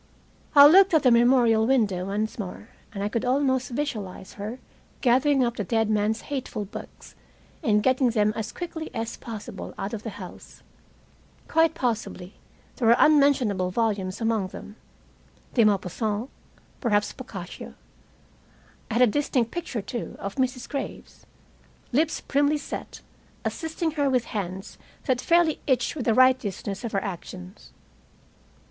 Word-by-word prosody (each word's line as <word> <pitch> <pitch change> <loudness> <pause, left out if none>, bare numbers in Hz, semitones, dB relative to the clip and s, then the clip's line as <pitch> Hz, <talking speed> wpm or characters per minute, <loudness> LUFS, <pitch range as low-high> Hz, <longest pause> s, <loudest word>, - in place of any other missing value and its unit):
I 285 0 +11
looked 375 +4 +7
at 310 - +4
the 255 - +5
memorial 235 -2 +4
window 210 -9 +2
once 210 +4 -3
more, 205 +2 -7 0.2
and 200 -1 -4
I - - +1
could 230 +2 -2
almost 260 0 +1
visualize 220 -9 -4
her 210 +4 -6 0.4
gathering 265 +2 +3
up 240 -1 -1
the 210 - -1
dead 225 +2 +1
man's 215 +1 +1
hateful 260 -7 -4
books, 195 - -10 0.5
and 210 -2 +2
getting 260 -1 +3
them 215 -2 +2
as 220 -1 -4
quickly 330 -2 -6
as 225 0 -3
possible 210 -4 -8
out 195 +3 -4
of 220 - -4
the 225 - -5
house. - - -11 0.8
Quite 325 0 +3
possibly 225 - -3 0.4
there 235 - +1
were 230 - +7
unmentionable 265 -11 +4
volumes 200 -2 -1
among 225 -4 0
them 210 +2 -10 0.8
de 235 - +4
Maupassant, 210 +3 0 0.5
perhaps 210 -4 +1
Boccaccio. 195 -9 -9 1.1
I 225 - -3
had 245 - +5
a - - +9
distinct 250 -1 0
picture, 320 - -4
too, 235 +3 -5
of 200 0 -5
Mrs. 255 -1 -1
Graves, 275 -1 -7 0.6
lips 305 +5 +1
primly 285 +2 +2
set, 290 - -7 0.4
assisting 320 0 -2
her 290 -2 +1
with 255 -3 +1
hands 190 -2 -5 0.3
that 255 -3 +1
fairly 335 -2 +3
itched 255 -1 +1
with 275 - -4
the 225 - +3
righteousness 255 -6 +2
of 235 - -3
her 195 - 0
actions. 185 0 -8
235 Hz, 145 wpm, -25 LUFS, 210-270 Hz, 1.1 s, I